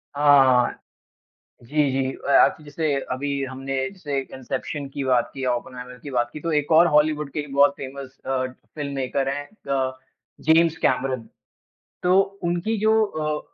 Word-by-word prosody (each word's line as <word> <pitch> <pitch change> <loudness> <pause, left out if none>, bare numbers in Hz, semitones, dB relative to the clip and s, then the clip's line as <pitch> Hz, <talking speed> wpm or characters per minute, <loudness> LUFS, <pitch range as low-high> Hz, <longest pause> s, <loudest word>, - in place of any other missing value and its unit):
हाँ, 145 -1 +6
हाँ। 125 -2 +3 0.8
जी, 145 +3 +1
जी। 130 0 0
अ, - - -7
आपने 155 - +4
जैसे 150 0 -1 0.2
अभी 140 +1 -2
हमने 135 +1 -5
जैसे 155 -8 -5 0.2
इंसेप्शन 135 +3 -4
की 140 0 -4
बात 125 -2 +2
की 135 -1 -4
ओपेनहाइमर 125 0 -4
की 145 - -6
बात 120 -2 0
की - - -6
तो 165 +2 -3
एक 150 0 0
और 165 +2 +7
हॉलीवुड 150 -1 +2
के 150 +1 -3
बहुत 140 0 +5
फ़ेमस 135 0 -8
अ, 130 -1 0 0.3
फ़िल्ममेकर 140 -2 -2
है 145 +1 -3 0.3
अ, 135 -1 +1 0.5
जेम्स 160 +1 +4
कैमरन। 130 -4 0 0.8
तो 180 +1 +4 0.2
उनकी 175 +6 0
जो 220 +1 +4
अ, 155 -5 -2
140 Hz, 155 wpm, -23 LUFS, 130-155 Hz, 0.8 s, और